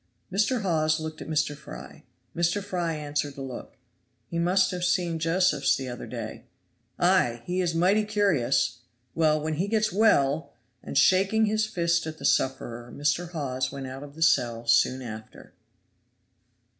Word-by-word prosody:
Mr. 215 +4 +1
Hawes 155 -3 +1
looked 155 0 -6
at - - -7
Mr. 150 -2 0
Fry; - - -11 0.3
Mr. 175 +4 +1
Fry 175 -4 -2
answered 145 -1 -3
the 135 - -6
look. 130 -2 -8 0.5
"He 170 +8 -4
must 185 +2 +3
have 180 -1 -4
seen 175 -2 +1
Josephs 180 +3 +2
the 130 -1 -5
other 120 - -7
day." - - -7 0.5
"Ay! 120 -1 +2
he 180 +1 -1
is 170 -2 -1
mighty 190 +6 +3
curious. 160 - +1 0.3
Well, 155 -2 +2
when 155 0 -3
he 185 +5 0
gets 215 -1 +1
well!" 160 -8 +2 0.3
and, - - -4
shaking 195 +7 +4
his 215 0 +1
fist 170 -4 0
at 160 0 -6
the 140 - -7
sufferer, 120 -3 0
Mr. 150 +4 -1
Hawes 130 -6 -3
went 135 -1 -6
out 130 +1 -7
of 145 0 -11
the 160 - -1
cell 120 -6 +2
soon 120 +3 +3
after. 110 -2 -10
160 Hz, 160 wpm, -26 LUFS, 135-185 Hz, 0.5 s, shaking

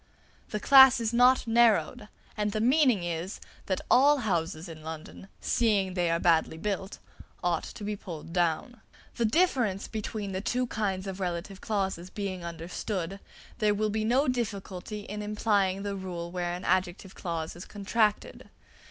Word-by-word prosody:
The 210 - -3
class 265 0 +8
is 230 0 -1
not 250 +2 +5
narrowed; 230 0 +3 0.3
and 210 -1 -1
the 215 - -1
meaning 250 - +3
is, 175 +2 -4 0.3
that 190 - -1
all 285 +3 +6
houses 170 -3 -1
in 160 -2 -10
London, 160 +4 -8
seeing 205 -5 +1
they 175 -2 0
are 165 - +2
badly 165 -2 +2
built, 195 +1 -3 0.5
ought 175 -2 0
to - - -9
be 210 +1 -2
pulled 165 -4 -9
down. 175 +7 0 0.4
The 235 - +2
difference 240 - +1
between 215 -2 -4
the 190 0 -3
two 250 +4 0
kinds 200 -5 -2
of 195 -1 -5
relative 185 +1 -4
clauses 190 -5 -2
being 185 -3 -4
understood, 170 +3 -4 0.4
there 210 -2 +3
will 215 +1 0
be 215 +1 -1
no 255 +6 +2
difficulty 210 -4 -3
in 210 +1 -6
applying 205 -2 0
the 200 -1 -3
rule 175 -3 -5
where 175 -1 -2
an 180 +1 -6
adjective 185 +1 0
clause 165 -3 -4
is 175 - -9
contracted. 210 +1 -1
195 Hz, 160 wpm, -28 LUFS, 175-220 Hz, 0.5 s, class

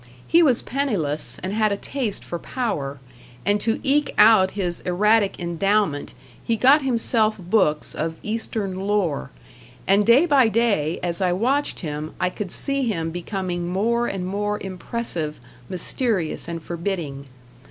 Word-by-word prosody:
He 340 - +5
was 260 -8 +4
penniless 200 - -2
and 190 +2 -3
had 215 -1 +2
a 200 - 0
taste 240 -3 -3
for 170 - -5
power, 145 - -3 0.5
and 205 +1 +2
to 225 +1 0
eke 285 +1 +1
out 210 -3 +7
his 175 -3 -1
erratic 205 +3 +2
endowment 175 -2 0 0.3
he 230 - 0
got 275 +6 +6
himself 230 -4 +1
books 180 -5 +1
of 160 +1 -3
Eastern 210 -3 -3
lore, 185 - 0 0.6
and 200 +2 +4
day 235 +9 +6
by 275 -7 +5
day 205 -8 +1
as 175 +1 -2
I 180 -1 +2
watched 260 +10 0
him 150 -2 -5
I 180 - +1
could 200 0 -5
see 275 +8 +1
him 165 -7 -2
becoming 175 0 -3
more 235 +5 +1
and 190 -2 -3
more 205 +2 -1
impressive, 185 -4 -4 0.3
mysterious 185 -2 -2
and 165 -1 -5
forbidding. 170 -6 -4
200 Hz, 145 wpm, -23 LUFS, 175-230 Hz, 0.6 s, out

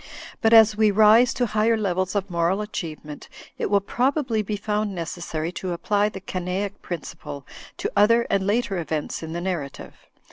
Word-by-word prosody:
But 225 - +3
as 220 -2 +7
we 215 0 +4
rise 220 +4 +6
to 250 - +1
higher 220 +1 +2
levels 185 -2 -1
of 200 -1 0
moral 170 +4 +1
achievement, 155 -7 -7 0.3
it - - -1
will 200 0 +3
probably 250 +1 0
be 210 0 -3
found 210 -1 -2
necessary 165 -1 -4
to 180 0 -4
apply 205 +4 +1
the 195 - -8
Canaic 190 +2 -4
principle 150 -4 -7 0.3
to - - -3
other 230 +3 +4
and 195 -1 0
later 205 -3 0
events 160 -2 -3
in 160 0 -6
the 170 - -3
narrative. 175 -7 -4
200 Hz, 170 wpm, -24 LUFS, 175-215 Hz, 0.3 s, as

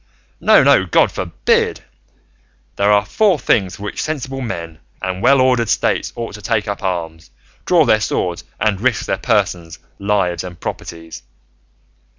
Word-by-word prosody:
No, - - +5
no; - - +5
God - - +3
forbid! - - 0 0.9
There 100 +1 +2
are 105 0 +3
four 195 - +2
things 95 -9 +1
for 100 - -11
which 105 - -4
sensible 135 -3 -4
men 85 -9 -6 0.2
and 95 0 -4
well 135 +4 +5
ordered 125 -3 +2
States - - 0
ought 115 -1 -5
to 105 - -9
take 105 0 -1
up 100 - -4
arms, 85 - -4 0.4
draw 170 -4 +4
their 110 -4 +3
swords, 90 -4 -2 0.2
and 105 -3 0
risk 125 -2 +1
their 95 - -2
persons, 90 -7 -1 0.2
lives, 100 -4 0
and 90 -2 -9
properties. 80 -1 -7
100 Hz, 155 wpm, -18 LUFS, 90-120 Hz, 0.9 s, No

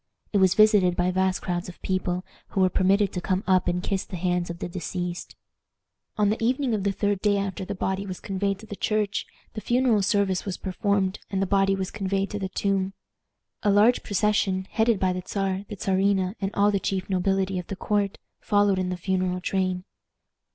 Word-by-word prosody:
It 200 - +4
was 190 -1 +4
visited 210 -4 +5
by 180 +1 +1
vast 185 0 0
crowds 175 0 -2
of 175 - -12
people, 185 -1 -1 0.2
who 195 - -1
were 185 -1 +4
permitted 195 +2 +2
to 180 - -3
come 185 +2 0
up 185 -1 +3
and 180 0 0
kiss 195 -1 -1
the - - -8
hands 180 0 -1
of 170 - -5
the - - -4
deceased. 175 0 -5 0.8
On 210 -1 +3
the 225 +1 -2
evening 255 +1 +1
of 205 -3 -1
the 200 - +1
third 205 0 0
day 205 0 +2
after 195 -1 -3
the 200 - -4
body 190 +1 -2
was 185 -1 -5
conveyed 195 0 -1
to 215 - -12
the 205 - -7
church, 210 -1 -1 0.3
the 215 - -5
funeral 240 -3 +2
service 195 -2 +1
was 195 -3 -4
performed, 195 0 0
and 195 - -1
the 195 - +2
body 195 0 +2
was 190 -1 -3
conveyed 195 -1 -1
to 205 - -3
the 190 -1 -3
tomb. 195 -1 0 0.7
A 210 - +2
large 210 +5 +5
procession, 200 -2 +1
headed 225 -2 +2
by 185 -1 +2
the 185 - -3
Czar, 195 0 -2
the 210 - -5
Czarina, 190 0 +1
and 195 - 0
all 205 +1 +4
the 200 - +1
chief 190 -1 -2
nobility 190 0 0
of 180 - -7
the 195 - -4
court, 200 0 -1 0.2
followed 205 -2 +2
in 185 -1 -1
the 180 - -3
funeral 185 0 -1
train. 185 -1 -1
195 Hz, 205 wpm, -25 LUFS, 185-205 Hz, 0.8 s, visited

